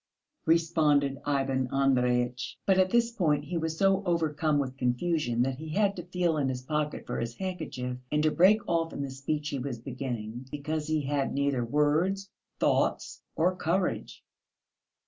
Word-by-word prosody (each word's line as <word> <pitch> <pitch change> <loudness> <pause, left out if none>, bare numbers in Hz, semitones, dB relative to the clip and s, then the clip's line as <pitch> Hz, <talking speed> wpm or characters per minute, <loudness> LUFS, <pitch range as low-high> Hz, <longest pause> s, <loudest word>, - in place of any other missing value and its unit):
responded 155 -4 +3
Ivan 135 -2 +1
Andreyitch. 125 -2 +1
But 190 -1 +4
at 185 0 +4
this 235 +2 +2
point 155 -10 +1
he 175 +4 -5
was 160 0 -2
so 195 +1 +3
overcome 160 -4 +1
with 135 -2 -2
confusion 125 -1 0
that 130 0 -2
he 160 0 -7
had 200 -1 +2
to 175 0 -7
feel 175 -3 0
in 140 -3 +1
his 130 -1 -4
pocket 150 +1 -2
for - - -3
his 115 0 -3
handkerchief 155 -9 -4
and 150 0 +2
to 155 - +3
break 205 +6 +4
off 165 -1 0
in 140 - -3
the 135 - -5
speech 145 +3 -3
he 140 - -3
was 130 -1 -4
beginning, 120 -2 -5
because 150 +2 -3
he 155 -1 +1
had 140 0 0
neither 140 -3 +1
words, 155 +9 +1 0.3
thoughts - - +1
or 180 +3 +2
courage.... 180 +1 -1
150 Hz, 165 wpm, -29 LUFS, 135-170 Hz, 0.3 s, But